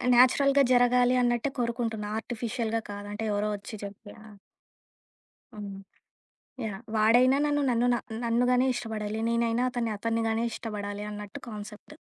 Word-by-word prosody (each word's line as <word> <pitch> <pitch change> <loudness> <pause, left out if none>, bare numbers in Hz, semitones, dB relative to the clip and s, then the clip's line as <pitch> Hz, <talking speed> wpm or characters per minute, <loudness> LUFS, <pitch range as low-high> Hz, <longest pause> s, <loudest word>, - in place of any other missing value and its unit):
న్యాచురల్‌గా 275 +3 +5
జరగాలి 245 0 +4
అన్నట్టే 240 +3 +1
కోరుకుంటున్న. 230 -3 -2
ఆర్టిఫిషియల్‌గా 230 -1 -3
కాదు 205 0 -7
అంటే 220 +2 -4
ఎవరో 210 +1 0
ఒచ్చి 200 +2 -9
చెప్పి 205 +2 -11
యహ్! 215 -1 -14 1.2
హ్మ్. 200 -2 -7 0.8
యాహ్! 210 -1 -4
వాడైనా 245 +5 +5
నన్ను 290 0 +1
నన్నునా 240 0 +2 0.2
నన్నుగానే 245 +2 +3
ఇష్టపడాలి. 220 -2 -4
నేనైనా 235 +1 +1
అతన్ని 235 -2 -1
అతన్నిగానే 225 +1 0
ఇష్టపడాలి 205 -2 -5
అన్నట్టు 205 -1 -8
కాన్సెప్టు. 210 +6 -9
230 Hz, 120 wpm, -28 LUFS, 210-245 Hz, 1.2 s, న్యాచురల్‌గా